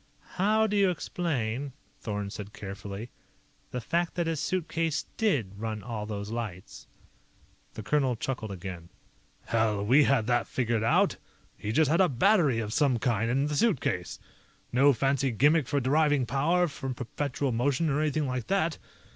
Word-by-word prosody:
"How 215 +4 +3
do 210 -1 -1
you 200 -2 +4
explain," 140 -7 -2 0.3
Thorn 105 -3 -4
said 105 0 -8
carefully, 100 +3 -7 0.6
"the 125 - -4
fact 170 +8 -1
that 175 -1 0
his 165 -2 -1
suitcase 165 -3 -1
did 120 - 0
run 110 -2 -4
all 110 -3 -5
those 105 0 -5
lights?" 110 -6 -6 0.9
The 110 - -6
colonel 130 +2 +1
chuckled 115 -2 -4
again. 90 -3 -7 0.6
"Hell, 110 -3 +1
we 135 +6 +5
had 130 -6 +2
that 120 0 +1
figured 120 -3 0
out. 115 - +3 0.4
He 105 - -4
just 150 +4 +3
had 170 - +4
a 185 - +4
battery 150 - +3
of 110 -2 -3
some 140 -4 +3
kind 115 -1 0
in 135 +3 +1
the 150 0 -2
suitcase. 135 - 0 0.5
No 140 +3 +5
fancy 135 +1 +1
gimmick 145 +5 +3
for 140 - +1
deriving 145 0 +2
power 160 +8 +2
from 135 -4 -5
perpetual 135 +2 -2
motion 135 +7 +1
or 150 0 +1
anything 155 0 0
like 125 -3 -3
that. 170 -5 0
130 Hz, 160 wpm, -28 LUFS, 110-155 Hz, 0.9 s, we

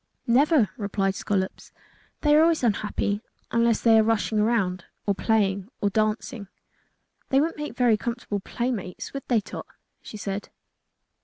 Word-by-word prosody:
"Never," 260 - +4
replied 200 -2 0
Scollops. 190 -1 -3 0.5
"They 295 -1 +4
always 320 -1 +4
are - - +5
unhappy 205 0 -1 0.3
unless 230 -1 +2
they 225 -1 +6
are - - +5
rushing 220 -1 +1
around 200 -5 +1 0.2
or 200 - +2
playing 200 -2 +1
or 205 - +1
dancing." 215 0 -1 0.8
"They 270 - +4
wouldn't 315 +1 0
make 295 -5 -5
very 240 -4 +4
comfortable 235 -3 -3
playmates, 215 -4 -4
would 275 - -6
they, 235 -4 +3
Tot?" - - -8 0.3
she 215 - -9
said. 200 0 -4
220 Hz, 145 wpm, -25 LUFS, 200-240 Hz, 0.8 s, they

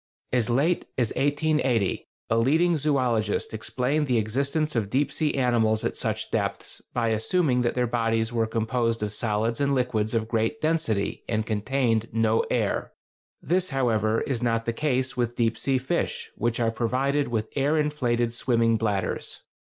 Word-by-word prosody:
As 120 -2 +1
late 145 +9 +2
as 120 -4 +1
1880 145 -7 +1 0.2
a 115 - +3
leading 160 +9 +3
zoölogist 130 -10 0
explained 130 +7 -1
the 125 -2 +2
existence 140 +8 0
of 110 -4 0
deep 140 +6 +1
sea 155 -2 0
animals 115 -4 +2
at - - -1
such - - -3
depths - - -3
by 120 -2 0
assuming 125 +4 +1
that 120 - 0
their 125 -1 +2
bodies 115 -1 0
were 115 -1 +1
composed 115 0 -1
of 105 -1 -3
solids 110 +2 -1
and 140 -1 +2
liquids 120 -4 0
of 110 -1 0
great 115 +5 0
density, 155 -11 0
and 110 -1 0
contained 115 +1 0
no 115 0 +2
air. - - -1 0.5
This, 185 +2 +1
however, 115 -5 +1
is 130 -4 -2
not 115 -1 0
the 115 - -1
case 130 -1 -1
with 120 -1 -1
deep 115 -1 +1
sea 135 +3 +1
fish, 130 +1 -2
which 120 +1 -1
are 115 -1 +2
provided 130 +5 0
with 110 -2 -2
air 145 +3 +2
inflated 120 -6 0
swimming 115 -2 +2
bladders. 105 -3 -2
120 Hz, 160 wpm, -26 LUFS, 115-135 Hz, 0.5 s, a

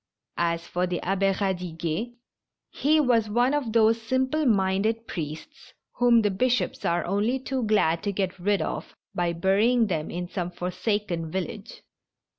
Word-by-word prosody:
As 170 0 0
for 180 +1 -1
the 175 -1 -2
Abbe 195 +1 +1
Eadiguet, 180 +2 -3 0.6
he 310 +3 +2
was 235 -6 +2
one 240 +5 +2
of 285 -6 -1
those 225 0 +3
simple 260 +6 0
minded 210 +2 +1
priests 165 - -7 0.2
whom 240 -2 +5
the 205 - +2
bishops 250 +6 0
are 170 0 0
only 205 +7 +1
too 265 0 -3
glad 190 -6 +2
to 205 - -1
get 190 -1 -2
rid 195 -1 +1
of 155 - -5 0.2
by 175 -1 0
burying 205 +8 +3
them 165 -7 -2
in 175 +1 -4
some 175 -1 -3
for 180 +1 -4
saken 185 -6 -2
village. 190 +3 -5
200 Hz, 155 wpm, -26 LUFS, 175-235 Hz, 0.6 s, whom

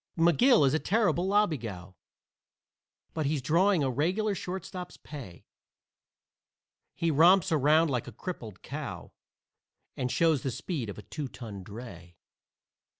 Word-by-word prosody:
McGill 170 - +5
is 135 - +2
a 155 - +2
terrible 190 -4 +1
lobbygow, 120 - 0 1.2
But 155 -3 -1
he's 150 0 0
drawing 170 +5 +3
a 135 - +1
regular 185 - 0
shortstop's 180 -1 -6
pay; 120 - -10 1.5
He 165 -1 0
romps 170 +5 +5
around 155 +1 +4
like 125 -2 -2
a - - -7
crippled 110 - -7
cow - - -6 0.8
And 125 -1 -2
shows 160 -5 +2
the 135 - -2
speed 125 - -4
of 100 - -7
a 105 - -9
two 150 -3 -5
ton 110 -6 -9
dray. 90 -5 -10
150 Hz, 130 wpm, -29 LUFS, 120-180 Hz, 1.5 s, McGill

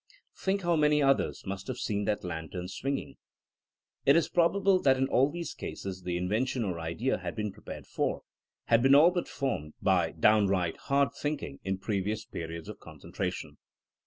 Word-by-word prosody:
Think 195 0 -1
how 175 -1 +2
many 150 -1 +4
others 135 0 +2
must 95 0 -5
have 130 - -4
seen 105 -2 -1
that 105 0 -1
lantern 90 +1 -5
swinging 135 +8 -4
I - - -11
It 140 - +8
is 165 - +3
probable 185 +2 +3
that 135 -1 +4
in 135 +1 +1
all 135 +2 +3
these 170 +2 -5
cases 95 -1 -6
the 90 -1 -2
invention 110 +7 0
or 90 -5 -3
idea 85 +11 -1
had - - -5
been 105 -2 -2
prepared - - -9
for, - - -2 0.4
had 115 0 +4
been 135 +2 +6
all 160 +5 +7
but 175 -1 -2
formed, 100 - -3
by - - +2
downright 100 -5 +3
hard 140 -1 +2
think 150 0 -3
ing 70 -1 -7
in 95 0 -1
previous 105 +1 -2
periods 85 0 -6
of - - -8
concentration. - - -6
115 Hz, 180 wpm, -30 LUFS, 95-140 Hz, 0.4 s, It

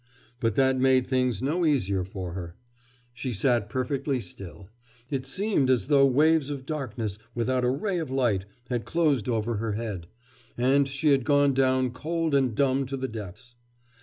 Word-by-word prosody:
But 115 -3 0
that 130 -1 +3
made 130 -1 +4
things 125 -3 0
no 160 +6 0
easier 100 - +1
for 90 -2 -6
her. 85 -2 -7 0.6
She 120 +2 -4
sat 115 0 +1
perfectly 130 +3 -1
still; 95 -1 -9 0.4
it 135 -1 -2
seemed 185 -3 +1
as 125 -1 +1
though 140 -2 +6
waves 150 +2 +3
of 140 -2 -5
darkness 115 -9 -4 0.2
without 125 +2 0
a 125 - +3
ray 180 +8 -1
of 160 - -4
light 120 -8 +1 0.3
had 120 -2 -1
closed 150 -9 +1
over 115 -1 -1
her 110 0 -2
head, 105 -6 -5 0.5
and 135 +3 +3
she 140 +3 0
had 135 -3 +4
gone 145 0 +3
down 130 -1 +2
cold 160 +4 -2
and 130 -5 +2
dumb 135 0 +1
to 135 +1 -4
the 130 0 -3
depths. 110 +2 -9
130 Hz, 170 wpm, -26 LUFS, 115-140 Hz, 0.6 s, though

